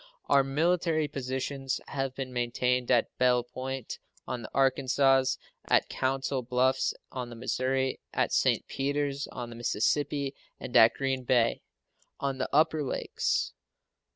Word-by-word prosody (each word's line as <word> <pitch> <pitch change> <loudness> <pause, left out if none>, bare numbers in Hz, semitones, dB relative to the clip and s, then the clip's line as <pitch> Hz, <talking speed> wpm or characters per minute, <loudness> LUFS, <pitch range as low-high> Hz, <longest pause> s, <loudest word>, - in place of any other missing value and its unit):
Our 140 - +4
military 160 +2 +1
positions 135 0 -3
have 135 -1 -2
been 130 -2 -5
maintained 125 +1 0
at 120 -2 +2
Belle 125 -1 +4
Point, 130 0 -6 0.3
on 125 - -3
the 110 - -8
Arkansas, 135 0 +3 0.4
at - - +3
Council 135 0 -1
Bluffs, 125 +2 +1 0.2
on 125 -2 -5
the 120 - -9
Missouri, 130 +3 -1
at - - 0
St. - - +2
Peters, 140 0 -1
on 120 -1 -7
the - - -8
Mississippi, 140 +5 0 0.3
and 120 - -7
at 115 -1 +7
Green 135 -1 -1
Bay, 120 -2 +2 0.6
on 135 -1 -2
the 130 - -1
upper 155 +1 +3
Lakes. 135 - -1
130 Hz, 135 wpm, -29 LUFS, 125-140 Hz, 0.6 s, at